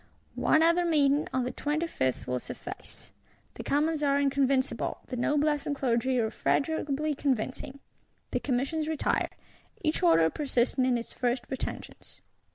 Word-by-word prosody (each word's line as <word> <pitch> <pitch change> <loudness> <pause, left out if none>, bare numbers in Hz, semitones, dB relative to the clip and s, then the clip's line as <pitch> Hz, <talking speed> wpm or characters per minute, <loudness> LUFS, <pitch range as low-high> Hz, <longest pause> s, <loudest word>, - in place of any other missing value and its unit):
One 315 - +3
other 335 +2 +4
meeting, 295 -3 +3
on 260 -1 0
the 250 - -2
25th, 295 - -1
will 125 0 -1
suffice: - - -9 0.4
the - - -8
Commons 300 +2 +1
are 280 -1 +2
inconvincible, 275 -1 0
the 255 - -5
Noblesse 295 +3 +1
and 285 - -1
Clergy 255 -1 +1
irrefragably 290 +5 0
convincing; 265 0 -2 0.5
the - - 0
Commissions 285 +4 -1
retire; 315 -2 0 0.5
each 305 - +1
Order 165 -2 +5
persisting 260 -3 +1
in 250 -1 +2
its 230 - -7
first 245 0 -1
pretensions. 265 - -6
275 Hz, 135 wpm, -29 LUFS, 250-300 Hz, 0.5 s, Order